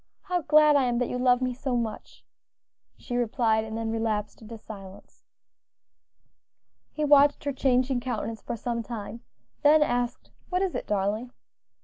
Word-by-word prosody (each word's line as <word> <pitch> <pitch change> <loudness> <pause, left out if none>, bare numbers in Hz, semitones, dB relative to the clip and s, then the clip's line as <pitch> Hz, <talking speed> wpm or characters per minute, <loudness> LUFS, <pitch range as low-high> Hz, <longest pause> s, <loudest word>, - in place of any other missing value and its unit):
how 360 -2 -1
glad 305 -1 +5
I 275 -2 +4
am 240 -1 0
that 245 0 0
you 250 - -3
love 250 0 +3
me 255 0 -1
so 255 0 -2
much!" 225 -2 -6 0.7
she 245 - -6
replied; 225 -2 +1
and 220 0 -6
then 225 0 -2
relapsed 220 -2 -2
into 225 +1 -9
silence. 195 -3 -12 1.7
He 305 - -2
watched 290 0 +5
her 285 -1 -2
changing 255 -1 +1
countenance 240 -3 -4
for - - -5
some 235 +1 -3
time, 230 0 -7 0.4
then 300 +1 +6
asked, 245 -3 -2 0.2
"What 365 +1 0
is 380 - -1
it, - - -4
darling?" 210 +4 -1
245 Hz, 155 wpm, -27 LUFS, 225-275 Hz, 1.7 s, then